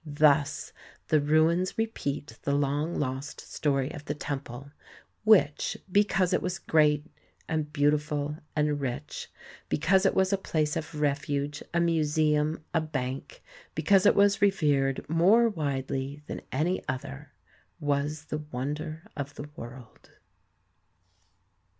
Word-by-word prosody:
Thus 150 -1 +2 0.4
the 155 - +5
ruins 160 +5 +2
repeat 155 -10 -3
the 140 - 0
long 145 +4 0
lost 135 0 -3
story 140 -2 -1
of 150 - -9
the 145 - -3
temple, 140 -1 -6 0.5
which, 185 -9 +4
because 195 -2 +3
it - - +2
was 180 0 -2
great 150 -4 +3 0.4
and 155 -2 -2
beautiful 150 0 +1 0.2
and 150 -1 +1
rich; 125 -3 -4 0.4
because 190 +5 +3
it 195 - +3
was 190 +1 +3
a 195 - +1
place 155 -5 0
of 155 0 -4
refuge, 145 0 -1
a 170 - +1
museum, 155 -2 +1
a 165 - +3
bank; 135 - -5 0.3
because 195 -1 +4
it - - +5
was 200 0 +4
revered 145 -9 +2
more 190 +9 +5
widely 140 - -3
than - - -6
any 165 +7 0
other, 140 +2 -5 0.5
was 145 0 -1
the 150 - -3
wonder 150 +5 -4
of 145 0 -5
the 145 +1 -7
world. 120 -4 -11
150 Hz, 125 wpm, -28 LUFS, 140-165 Hz, 0.5 s, the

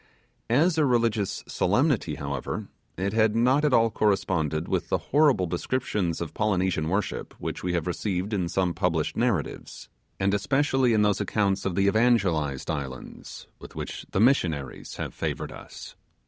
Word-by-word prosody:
As 160 +7 +3
a 155 - +4
religious 115 -5 0
solemnity, - - +1
however, 70 -2 -4 0.3
it 95 +3 -1
had 110 -1 +3
not 130 +5 +3
at 150 - +3
all 115 -2 +4
corresponded 85 -7 0
with - - -1
the - - +2
horrible 140 -10 +3
descriptions 90 -1 -2
of 80 -2 -5
Polynesian 95 -6 0
worship 100 +4 -2
which - - -5
we 90 -1 -2
have 85 -2 -1
received 95 +2 -2
in 90 -4 0
some 90 -2 0
published 85 -4 0
narratives, 115 -11 -2 0.3
and 100 +1 +1
especially 135 +3 +2
in 105 -1 +3
those 105 -2 +2
accounts 100 -2 0
of 90 - -2
the 100 +1 +2
evangelized 95 - +2
islands 65 -4 -7
with - - -12
which - - -6
the - - -1
missionaries 90 - +1
have - - -5
favoured - - -3
us. - - -11
100 Hz, 155 wpm, -26 LUFS, 85-115 Hz, 0.3 s, a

